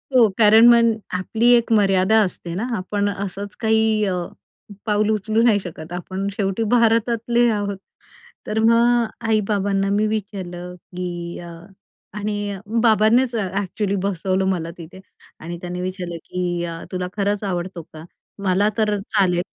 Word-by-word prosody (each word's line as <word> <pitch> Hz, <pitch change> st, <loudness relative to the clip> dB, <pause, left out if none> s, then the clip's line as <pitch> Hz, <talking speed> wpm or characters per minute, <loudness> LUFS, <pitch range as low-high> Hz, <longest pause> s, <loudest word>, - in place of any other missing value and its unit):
हो, 235 Hz, -4 st, +6 dB
कारण 220 Hz, +1 st, +7 dB
मग 235 Hz, -1 st, +6 dB, 0.2 s
आपली 220 Hz, +6 st, 0 dB
एक 235 Hz, -1 st, +1 dB
मर्यादा 195 Hz, 0 st, +4 dB
असते 180 Hz, -3 st, -3 dB
ना, 205 Hz, +6 st, -2 dB
आपण 205 Hz, +2 st, -1 dB
असंच 200 Hz, 0 st, -5 dB
काही 220 Hz, -1 st, +2 dB
अ, 190 Hz, -, 0 dB, 0.7 s
पाऊल 210 Hz, 0 st, +1 dB
उचलू 215 Hz, +1 st, +1 dB
नाही 230 Hz, -3 st, +4 dB
शकत. 170 Hz, -3 st, -9 dB
आपण 185 Hz, +2 st, -4 dB
शेवटी 195 Hz, +2 st, -1 dB
भारतातले 235 Hz, 0 st, +3 dB
आहोत. 205 Hz, -2 st, -2 dB, 0.7 s
तर 220 Hz, -, -1 dB
मग 235 Hz, +1 st, +4 dB, 0.2 s
आई-बाबांना 200 Hz, -2 st, +1 dB
मी 210 Hz, +2 st, +2 dB
विचारलं, 185 Hz, -4 st, -5 dB
की 175 Hz, -1 st, -6 dB
अ, 175 Hz, -, -9 dB, 0.7 s
आणि 205 Hz, -1 st, -3 dB, 0.3 s
बाबांनीच, 230 Hz, +3 st, +4 dB
ॲक्चुअली 200 Hz, 0 st, -2 dB
बसवलं 190 Hz, 0 st, 0 dB
मला 170 Hz, -3 st, -2 dB
तिथे 170 Hz, +2 st, -11 dB, 0.4 s
आणि 170 Hz, +2 st, -6 dB
त्यांनी 180 Hz, 0 st, -5 dB
विचारलं, 180 Hz, -2 st, -4 dB
की 175 Hz, -1 st, -2 dB
"अ, 165 Hz, -1 st, -6 dB
तुला 180 Hz, -1 st, -3 dB
खरंच 205 Hz, +1 st, 0 dB
आवडतो 180 Hz, -2 st, -3 dB
का? 155 Hz, 0 st, -10 dB, 0.4 s
मला 195 Hz, +2 st, +2 dB
तर 210 Hz, -2 st, +1 dB
चालेल, 195 Hz, -4 st, +1 dB
200 Hz, 140 wpm, -21 LUFS, 180-220 Hz, 0.7 s, कारण